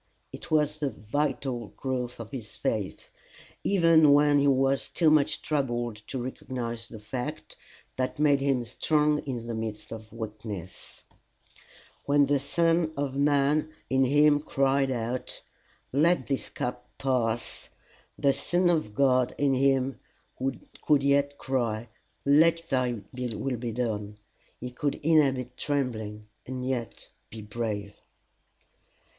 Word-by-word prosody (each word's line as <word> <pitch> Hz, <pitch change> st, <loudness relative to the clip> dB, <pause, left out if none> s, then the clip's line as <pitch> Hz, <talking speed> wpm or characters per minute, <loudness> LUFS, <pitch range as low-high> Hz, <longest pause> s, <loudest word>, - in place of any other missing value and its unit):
It -, -, -9 dB
was 150 Hz, -1 st, +2 dB
the 145 Hz, -2 st, 0 dB
vital 130 Hz, 0 st, -2 dB
growth 125 Hz, -3 st, -3 dB
of 115 Hz, -1 st, -8 dB
this 115 Hz, -6 st, -7 dB
faith, 105 Hz, -4 st, -3 dB, 0.5 s
even 165 Hz, -6 st, +5 dB
when 145 Hz, 0 st, +5 dB
he 140 Hz, -, +3 dB
was 135 Hz, 0 st, +2 dB
too 160 Hz, -3 st, +3 dB
much 150 Hz, -2 st, +2 dB
troubled 120 Hz, -6 st, -1 dB
to 135 Hz, -, -4 dB
recognize 120 Hz, -2 st, -5 dB
the 115 Hz, -, -9 dB
fact, 120 Hz, +4 st, -6 dB, 0.4 s
that 130 Hz, 0 st, -1 dB
made 145 Hz, -2 st, +3 dB
him 135 Hz, -3 st, +1 dB
strong 150 Hz, +5 st, +1 dB
in 120 Hz, -4 st, -3 dB
the 115 Hz, -, -4 dB
midst 110 Hz, -1 st, -5 dB
of 110 Hz, -1 st, -8 dB
weakness; 105 Hz, -4 st, -7 dB, 1.0 s
when 145 Hz, 0 st, +5 dB
the 140 Hz, 0 st, +2 dB
son 165 Hz, +3 st, +2 dB
of 140 Hz, -1 st, -2 dB
man 145 Hz, +2 st, +2 dB, 0.2 s
in 135 Hz, 0 st, +4 dB
him 145 Hz, +2 st, +5 dB
cried 135 Hz, -1 st, +1 dB
out, 120 Hz, 0 st, -3 dB, 0.5 s
Let 155 Hz, 0 st, +3 dB
this 135 Hz, -2 st, -2 dB
cup 125 Hz, 0 st, -5 dB
pass, 120 Hz, -4 st, -1 dB, 0.5 s
the 140 Hz, -1 st, +3 dB
son 175 Hz, +4 st, +2 dB
of 155 Hz, -11 st, -1 dB
God 130 Hz, -2 st, +3 dB
in 140 Hz, -1 st, +2 dB
him 135 Hz, -1 st, +2 dB, 0.8 s
could 145 Hz, -2 st, +3 dB
yet 140 Hz, 0 st, +2 dB
cry, 120 Hz, -4 st, -2 dB, 0.4 s
Let 165 Hz, +4 st, +5 dB
thy 125 Hz, -4 st, +1 dB
will 125 Hz, 0 st, -3 dB
be 120 Hz, 0 st, -4 dB
done. 105 Hz, -3 st, -2 dB, 0.4 s
He 125 Hz, 0 st, -6 dB
could 140 Hz, +3 st, -1 dB
"inhabit 135 Hz, -5 st, +2 dB
trembling," 110 Hz, -7 st, -2 dB, 0.2 s
and 130 Hz, 0 st, -4 dB
yet 120 Hz, -5 st, -4 dB, 0.2 s
be 110 Hz, -1 st, -9 dB
brave. 105 Hz, -2 st, -4 dB
130 Hz, 130 wpm, -28 LUFS, 115-145 Hz, 1.0 s, even